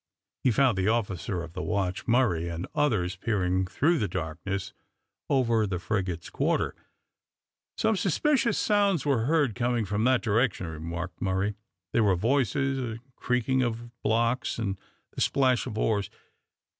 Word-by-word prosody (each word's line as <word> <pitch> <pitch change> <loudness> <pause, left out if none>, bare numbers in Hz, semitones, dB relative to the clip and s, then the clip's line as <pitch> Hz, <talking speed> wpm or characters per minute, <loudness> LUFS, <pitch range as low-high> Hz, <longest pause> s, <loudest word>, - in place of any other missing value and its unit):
He - - +4
found 125 -4 +3
the 95 - +1
officer 100 -5 -1
of 85 -1 -10
the 90 - -4
watch, 95 -3 -2
Murray, 110 -9 +2
and 85 +2 -4
others 105 - +1
peering 95 -3 0
through 160 - +2
the 105 - 0
darkness, 90 +3 -4 0.6
over 115 -5 +2
the 95 -2 -2
frigate's 90 -2 -3
quarter. - - 0 1.0
"Some 220 0 +2
suspicious 230 - +2
sounds 200 -7 +2
were 130 -6 +2
heard 145 -5 +2
coming 120 0 0
from 105 +3 -1
that 130 -1 +3
direction," 110 -3 +1
remarked 85 +2 -6
Murray. 95 +2 0 0.4
"There 115 - +4
were 100 -3 +4
voices, 135 +5 +1
and 120 +1 -6
creaking 125 +1 +1
of 120 -1 -2
blocks, 115 +3 +1
and 100 -4 -2 0.3
the - - -6
splash 130 -2 +2
of 110 -3 -5
oars. 105 -3 +1
110 Hz, 145 wpm, -27 LUFS, 95-130 Hz, 1.0 s, He